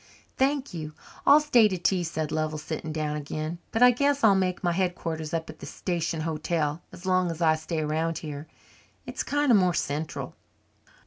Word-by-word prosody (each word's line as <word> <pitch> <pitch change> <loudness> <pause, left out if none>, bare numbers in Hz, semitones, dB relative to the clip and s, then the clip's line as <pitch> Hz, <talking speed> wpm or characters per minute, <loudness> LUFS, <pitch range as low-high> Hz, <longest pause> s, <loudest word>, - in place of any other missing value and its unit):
"Thank 275 -1 0
you, 155 -2 -6 0.3
I'll 290 - +9
stay 250 -7 +5
to 190 -3 -2
tea," 180 +1 +1
said 160 -2 -3
Lovell, 155 0 -1
sitting 155 +1 -5
down 150 -1 -2
again, 155 +3 -4
"but 225 - +3
I 250 - +9
guess 280 +2 +1
I'll 215 -3 +7
make 185 -1 0
my 175 - +2
headquarters 170 -3 -2
up 165 -1 -2
at 155 0 -10
the - - -8
station 170 -2 -2
hotel 155 0 -1
as 175 - -12
long 185 -1 +2
as 165 -1 -5
I 160 -2 +4
stay 155 0 -3
round 160 +2 -1
here. 150 -1 -7 0.6
It's - - -4
kind 290 -2 +1
of 215 - +7
more 180 -2 +2
central." 150 +2 -3
165 Hz, 190 wpm, -27 LUFS, 155-190 Hz, 0.6 s, I'll